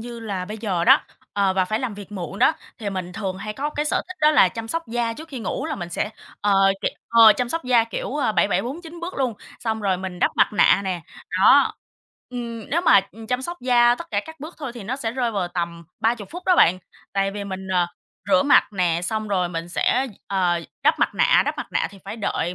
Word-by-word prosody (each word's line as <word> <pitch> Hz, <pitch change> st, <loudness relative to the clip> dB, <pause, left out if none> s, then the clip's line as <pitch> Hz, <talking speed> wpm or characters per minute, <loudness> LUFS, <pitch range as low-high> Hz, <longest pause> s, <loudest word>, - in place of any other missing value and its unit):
như 235 Hz, 0 st, -8 dB
là 200 Hz, -5 st, -4 dB
bây 210 Hz, +3 st, -7 dB
giờ 190 Hz, -6 st, -1 dB
đó, -, -, +7 dB, 0.3 s
ờ, 200 Hz, -2 st, +2 dB
và 185 Hz, 0 st, +2 dB
phải 215 Hz, +4 st, -1 dB
làm 250 Hz, -5 st, -3 dB
việc 205 Hz, 0 st, -10 dB
muộn 190 Hz, 0 st, -6 dB
đó, -, -, +5 dB, 0.3 s
thì 205 Hz, -3 st, -3 dB
mình 185 Hz, -2 st, -5 dB
thường 190 Hz, -2 st, -4 dB
hay 210 Hz, +2 st, -5 dB
có 285 Hz, +7 st, -3 dB
cái 295 Hz, 0 st, -2 dB
sở -, -, 0 dB
thích 370 Hz, -, -8 dB
đó 300 Hz, 0 st, +6 dB
là 240 Hz, -11 st, +6 dB
chăm 225 Hz, +3 st, -7 dB
sóc 330 Hz, +4 st, -2 dB
da 235 Hz, 0 st, -1 dB
trước 320 Hz, +7 st, -10 dB
khi 265 Hz, -5 st, -6 dB
ngủ, -, -, -3 dB
là -, -, -2 dB
mình 175 Hz, -2 st, -6 dB
sẽ, 190 Hz, +4 st, -2 dB, 0.3 s
ờ, 205 Hz, 0 st, +2 dB, 0.3 s
kẹ, -, -, +1 dB, 0.2 s
ờ, 225 Hz, -2 st, +8 dB
chăm 245 Hz, +2 st, -2 dB
sóc 330 Hz, +1 st, -3 dB
da, 245 Hz, -3 st, +4 dB
kiểu, 255 Hz, +4 st, -4 dB
a, 255 Hz, -7 st, +1 dB
7749 320 Hz, -, -1 dB
bước 350 Hz, +2 st, -5 dB
luôn, 250 Hz, -5 st, 0 dB, 0.3 s
xong 220 Hz, -1 st, -2 dB
rồi 195 Hz, -2 st, +1 dB
mình 185 Hz, -1 st, -6 dB
đắp -, -, +3 dB
mặt -, -, +3 dB
nạ 205 Hz, -, +5 dB
nè, 185 Hz, -2 st, -2 dB, 0.4 s
đó. -, -, +6 dB, 0.6 s
Ừm, 235 Hz, -3 st, -6 dB
nếu 335 Hz, +4 st, +2 dB
mà, 340 Hz, -, +6 dB
ừm, 225 Hz, +1 st, -11 dB
chăm 250 Hz, +2 st, -1 dB
sóc 345 Hz, +5 st, -4 dB
da 240 Hz, -1 st, +4 dB
tất 335 Hz, +7 st, -8 dB
cả -, -, +1 dB
các 320 Hz, -3 st, -11 dB
bước 315 Hz, +4 st, -8 dB
thôi 275 Hz, -6 st, -5 dB
thì 240 Hz, -, -8 dB
nó 250 Hz, +5 st, -3 dB
sẽ 230 Hz, -4 st, -3 dB
rơi 245 Hz, -2 st, 0 dB
vào 190 Hz, -4 st, -2 dB
tầm 170 Hz, -1 st, -4 dB, 0.2 s
30 225 Hz, -3 st, 0 dB
phút 355 Hz, +3 st, -7 dB
đó 365 Hz, -2 st, +5 dB
bạn, 180 Hz, +2 st, +5 dB, 0.3 s
tại 195 Hz, 0 st, +1 dB
vì 205 Hz, 0 st, -5 dB
mình, 190 Hz, -1 st, -6 dB
ờ, 175 Hz, -1 st, +3 dB, 0.4 s
rửa 185 Hz, -2 st, +5 dB
mặt 285 Hz, -, +4 dB
nè, 175 Hz, -3 st, +1 dB
xong 215 Hz, +2 st, -2 dB
rồi 180 Hz, -3 st, +1 dB
mình 165 Hz, 0 st, -5 dB
sẽ, 255 Hz, +8 st, +1 dB, 0.2 s
ờ, 180 Hz, -3 st, +1 dB, 0.2 s
đắp -, -, +3 dB
mặt -, -, +1 dB
nạ, -, -, +4 dB
đắp -, -, -2 dB
mặt -, -, -5 dB
nạ -, -, 0 dB
thì 200 Hz, -, -14 dB
phải 205 Hz, +3 st, -6 dB
đợi 180 Hz, -4 st, -2 dB
220 Hz, 250 wpm, -23 LUFS, 190-250 Hz, 0.6 s, ờ